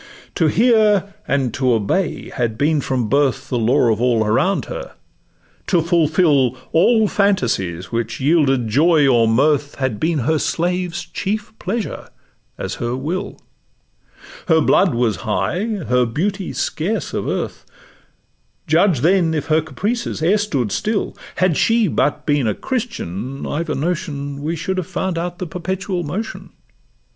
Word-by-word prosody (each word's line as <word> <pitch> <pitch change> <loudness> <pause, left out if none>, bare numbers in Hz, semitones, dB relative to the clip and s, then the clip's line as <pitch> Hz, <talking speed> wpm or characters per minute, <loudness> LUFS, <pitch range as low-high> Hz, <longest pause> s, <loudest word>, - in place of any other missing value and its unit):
'To 165 - +2
hear 210 0 +3
and 135 -4 0
to 130 -2 +1
obey' 115 - -1
had 115 -4 -2
been 150 +2 +2
from 125 -4 -1
birth 135 0 +1
The 125 - 0
law 120 +1 +3
of 110 - -4
all 120 -3 +2
around 130 - +1
her; - - -7 0.7
to 180 - +3
fulfill 155 -6 +2
All 220 +6 +4
phantasies 115 - 0
which 115 0 -2
yielded 135 -4 +2
joy 150 +5 +4
or 120 -3 +4
mirth, 145 +5 +2
Had 130 -6 -2
been 160 0 +1
her 160 +1 +2
slaves' 175 +1 -1
chief 205 +4 -4
pleasure, 210 +3 -4 0.5
as - - -4
her 120 +1 -1
will; 180 +9 -4 1.1
Her 160 -2 +4
blood 175 0 +3
was 115 -3 +1
high, 150 - -1 0.2
her 125 0 +2
beauty 185 - -2
scarce 180 +2 -2
of - - -2
earth: - - -3 1.0
Judge, 165 -3 +3
then, 170 0 +3
if 150 +1 -3
her 155 +1 +4
caprices 185 - -3
e'er 195 +6 +3
stood 140 - -1
still; 215 0 -1 0.2
Had 185 -3 +2
she 225 +3 +3
but 145 -2 0
been 145 -5 +1
a 105 - 0
Christian, 135 - -4
I've 165 +2 -3
a 155 - -1
notion 145 -3 -3
We 160 +3 -2
should 190 +4 -3
have 185 - -2
found 185 -1 -2
out 175 +1 -4
the 185 - -4
'perpetual 185 +2 -3
motion. 185 +8 -5
160 Hz, 150 wpm, -19 LUFS, 130-185 Hz, 1.1 s, All